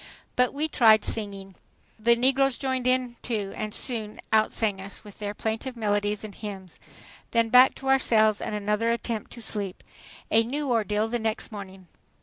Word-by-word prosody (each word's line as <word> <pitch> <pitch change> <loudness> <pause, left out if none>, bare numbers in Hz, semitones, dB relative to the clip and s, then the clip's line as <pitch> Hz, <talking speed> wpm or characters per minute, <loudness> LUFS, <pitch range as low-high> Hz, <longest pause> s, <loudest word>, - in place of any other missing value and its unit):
But 250 0 +3
we 300 +3 -1
tried 220 -7 +5
to - - -1
sing. 200 -3 -5 0.5
The 235 +2 +4
negroes 265 +2 +3
joined 260 -2 -1
in, 255 -1 +1
too, 210 -5 -3
and 215 0 -4
soon 220 -2 -3
outsang 215 -2 +2
us, 195 +2 -7
with 205 -2 -14
their 205 0 -4
plaintive 225 +4 -3
melodies 205 -1 0
and 215 -2 -7
hymns. 195 -5 -8 0.5
Then 230 -1 +2
back 250 +2 +7
to 270 - -8
our 270 0 +5
cells 215 -4 +3
and 210 - -3
another 210 +2 0
attempt 235 -2 -3
to 235 - -9
sleep. 200 -4 -4 0.5
A 225 +1 +5
new 275 +3 -2
ordeal 215 -1 +1
the 240 +1 -2
next 220 +1 -2
morning! 190 -3 -9
220 Hz, 175 wpm, -26 LUFS, 205-245 Hz, 0.5 s, back